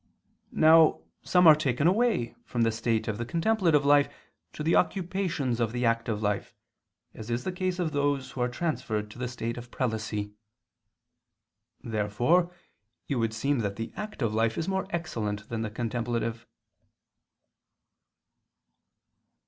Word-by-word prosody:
Now 160 0 +6 0.2
some 180 -1 +3
are 160 - +11
taken 140 -2 0
away 190 - +2
from 120 -2 -1
the 115 - +3
state 115 0 -1
of 110 -1 -3
the - - -1
contemplative 165 - +2
life 145 0 +4 0.4
to 150 - -5
the 160 - +2
occupations 175 - 0
of 115 -1 0
the 125 0 -1
active 115 -2 0
life, 105 -1 -2 0.6
as 110 +1 -9
in 120 - +1
the 125 +10 -4
case 185 0 -2
of 175 -4 -1
those 145 -2 0
who 125 - -5
are 125 - +1
transferred 115 -7 -2
to 120 - -12
the 125 - -2
state 115 -1 -4
of 120 0 -8
prelacy. 110 -4 -3 1.5
Therefore 120 - +1 0.6
it - - -1
would 115 -1 0
seem 140 +4 0
that 100 -3 -2
the 115 +1 -6
active 140 - -3
life 115 +1 +1
is 165 - -2
more 190 0 -1
excellent 110 - -3
than 115 -1 -3
the 110 - -2
contemplative. 115 0 -3
120 Hz, 145 wpm, -28 LUFS, 115-165 Hz, 1.5 s, are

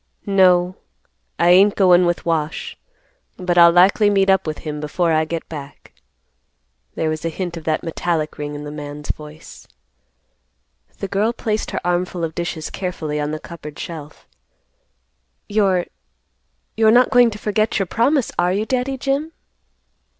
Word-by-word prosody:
"No, 185 -2 +3 0.6
I 175 +1 +4
ain't 195 +3 +6
goin' 180 -2 +5
with 175 - -2
Wash; 160 -2 -2 0.6
but 180 -2 -1
I'll 170 -1 +8
likely 190 +4 +5
meet 195 -1 +3
up 190 -3 +1
with 155 - -3
him 150 -1 -4
before 165 +3 -1
I 155 0 +2
get 165 +1 -5
back." 145 -3 -10 1.0
There 160 - -1
was 155 0 -3
a 165 - -1
hint 175 +1 -5
of 165 -2 -9
that 155 -1 0
metallic 165 -2 -2
ring 145 0 -4
in 145 - -7
the 145 - -7
man's 150 0 -5
voice. 150 +1 -12 1.3
The 195 - -4
girl 210 +4 0
placed 215 -2 -2
her - - -3
armful 175 0 -1
of 160 -1 -2
dishes 170 -2 -4
carefully 160 -5 -4
on 150 0 -2
the 155 0 -4
cupboard 150 -3 -10
shelf; 155 -3 -8 1.2
"You're—you're 205 +2 -2
not 245 +2 +4
going 245 -2 +6
to 210 - -7
forget 215 +1 0
your 195 - 0
promise, 245 - +1
are 175 0 +2
you, 205 +3 -1
Daddy 260 +2 -1
Jim?" 280 +5 -2
175 Hz, 155 wpm, -20 LUFS, 155-200 Hz, 1.3 s, I'll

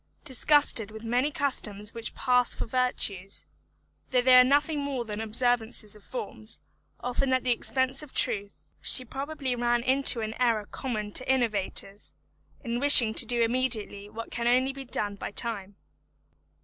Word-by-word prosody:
Disgusted 280 -5 +2
with 220 +1 -11
many 245 +5 0
customs 210 -8 -2
which 230 -1 -5
pass 250 -2 +2
for - - -4
virtues, 210 -6 -1 0.6
though 250 -1 +2
they 255 0 +6
are 250 - +9
nothing 290 +3 +2
more 275 -4 -3
than 210 0 -5
observances 225 -1 0
of 210 - -16
forms, 220 -2 -7 0.4
often 250 +2 -1
at 255 - +1
the 250 - +1
expense 260 +3 +1
of 300 -3 -7
truth, 205 -4 +1 0.2
she 255 - +2
probably 270 0 -4
ran 240 0 0
into 260 -2 +2
an 220 0 -4
error 225 -4 +1
common 215 -4 -5
to 255 +4 +1
innovators, 210 -5 -2 0.5
in 235 -1 -3
wishing 250 -5 +7
to - - +2
do 240 -1 +1
immediately 230 -4 -1
what 225 +2 -8
can 235 0 -2
only 255 +2 +2
be 270 0 -9
done 210 -4 -2
by - - -5
time. 205 -2 -4
240 Hz, 160 wpm, -27 LUFS, 215-260 Hz, 0.6 s, are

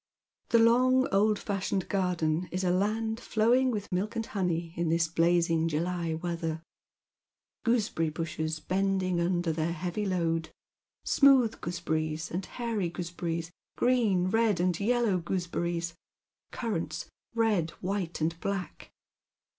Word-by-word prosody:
The 235 - +5
long 255 +3 +5
old 210 +2 +4
fashioned 195 -2 -2
garden 180 -3 0
is 185 +1 -2
a 180 - +2
land 220 +4 0
flowing 245 +3 +2
vrith 205 -4 -4
milk 200 +5 -1
and 225 -1 -1
honey 175 -5 -2
in 170 -1 0
this 165 0 +2
blazing 165 0 +2
July 165 +1 -1
weather. 165 -1 -3 1.0
Gooseberry 215 -9 +1
bushes 160 0 -3
bending 185 +1 0
under 175 -1 +1
their 160 +1 -1
heavy 180 +5 -3
load; 165 -3 0 0.6
smooth 265 -5 +5
gooseberries 160 -2 -2
and 180 +2 -3
hairy 225 -7 -2
goose 175 0 -5
berries, 170 0 -3 0.3
green, 215 -8 +2
red, 225 -3 +2
and 180 -1 +1
yellow 225 -3 +2
gooseberries, 170 -1 -2 0.6
currants 215 -9 -3 0.3
red, 210 -8 +1
wliite, 185 -2 -2
and 165 +1 0
black. 195 -2 -4
180 Hz, 125 wpm, -29 LUFS, 165-210 Hz, 1.0 s, The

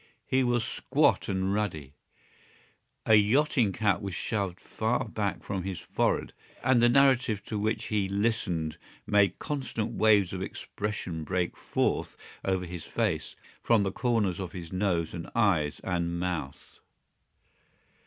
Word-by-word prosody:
He 130 0 +2
was 120 -2 +1
squat - - +1
and 95 0 0
ruddy. 80 -10 -2 1.1
A 110 - +4
yachting 115 +2 +4
cap 105 0 +1
was 100 -3 -4
shoved 100 -6 -2
far - - -1
back - - -3
from 95 -2 -3
his 95 -1 -4
forehead - - -1 0.3
and 125 -1 +4
the 120 - +6
narrative 130 -5 +3
to 105 - -3
which 110 +2 0
he 100 -3 0
listened 100 -7 -1 0.3
made 100 -3 +3
constant 130 -7 -3
waves 105 -4 +4
of 95 - -4
expression 95 -4 -4
break 90 +2 -1
forth - - -1 0.3
over 95 -1 0
his 85 -1 -7
face - - -1 0.3
from 115 -3 +3
the 95 - -1
corners 105 -6 0
of 95 -1 -5
his 90 -2 -7
nose 90 -4 0
and 85 -1 -6
eyes 90 -10 +2
and 85 -2 -1
mouth. 85 -7 -4
100 Hz, 140 wpm, -29 LUFS, 90-110 Hz, 1.1 s, the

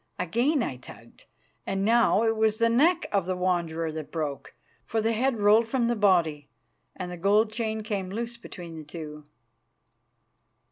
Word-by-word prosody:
Again 240 - +1
I 130 - -4
tugged, 125 - -15 0.4
and 195 0 -1
now 230 -1 +4
it 225 0 +2
was 220 -1 +2
the 230 0 +3
neck 325 +9 +3
of 195 -3 0
the 185 - -1
Wanderer 170 -3 -1
that 155 -1 -7
broke, 150 -4 -4 0.3
for 225 - -2
the 225 +1 +1
head 245 +1 0
rolled 210 +3 +5
from 235 0 0
the 240 - +1
body, 170 -8 +2 0.5
and 180 -1 -6
the 180 - -6
gold 210 +5 +3
chain 220 -1 -2
came 200 -4 -3
loose 235 +4 -4
between 175 -7 -10
the 155 - -7
two. 150 -1 -9
205 Hz, 170 wpm, -27 LUFS, 170-230 Hz, 0.5 s, rolled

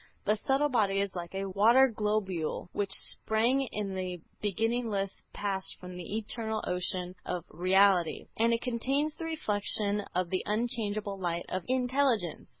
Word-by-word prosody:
The 210 - +3
subtle 270 +6 +1
body 205 -6 +2
is 200 -1 -1
like 175 +1 -5
a 195 0 -2
water 225 +7 +6
globule 210 -8 -1
which 200 -1 -1
sprang 230 +7 +2
in 205 -2 -3
the 185 -1 -3 0.2
beginningless 210 -1 0 0.2
past 195 -2 -3
from 180 0 -8
the 180 +4 -4
eternal 220 0 -3
ocean 180 0 -1
of 180 -2 -3
Reality; 185 -1 +3
and 230 +1 +3
it 230 0 0
contains 270 +5 0
the 330 - -6
reflection 210 -8 0
of 180 -1 0
the 185 - +1
unchangeable 210 -3 -1
light 175 -2 -2
of 185 -1 -2
Intelligence. 250 - +1
205 Hz, 150 wpm, -30 LUFS, 185-230 Hz, 0.2 s, water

